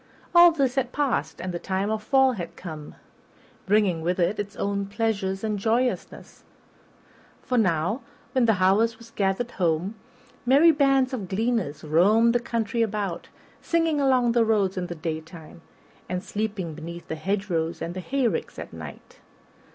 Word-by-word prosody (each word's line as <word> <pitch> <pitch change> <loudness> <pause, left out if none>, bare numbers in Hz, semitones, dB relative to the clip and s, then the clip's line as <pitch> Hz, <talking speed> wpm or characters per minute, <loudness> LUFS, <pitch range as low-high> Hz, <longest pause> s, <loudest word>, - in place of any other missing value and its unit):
All 345 0 +8
this 275 -6 0
had 260 -2 -1
passed 285 -2 -1
and 185 -1 -4
the 175 - -3
time 195 +3 -2
of 220 -1 -1
fall 265 +3 +4
had 180 -8 -6
come, 155 -4 -8 0.7
bringing 195 -5 +2
with 180 +3 -1
it 180 +5 +1
its 205 0 -4
own 200 0 -2
pleasures 200 -2 -2
and 210 -2 -1
joyousness; 235 +4 -2 1.0
for 250 - -2
now, 185 - +1 0.3
when 255 -2 +2
the 225 -2 +4
harvest 200 +5 +2
was 230 0 -15
gathered 200 +4 -1
home, 175 +2 0 0.5
merry 280 +7 +6
bands 275 -3 +2
of 210 -7 -4
gleaners 210 -6 -1
roamed 205 +10 +4
the 245 - +3
country 230 -1 -2
about, 205 -5 -2 0.3
singing 330 -3 +1
along 255 -3 +3
the 235 0 +3
roads 210 -4 +1
in 180 -1 -3
the 175 - -6
daytime, 160 0 -7 0.5
and 180 +1 -3
sleeping 205 -6 -3
beneath 170 +2 -8
the - - -4
hedgerows 170 -1 -2
and 165 +1 -4
the 185 - -5
hay 260 +6 0
ricks - - -3
at - - -8
night. - - -10
205 Hz, 160 wpm, -25 LUFS, 180-240 Hz, 1.0 s, All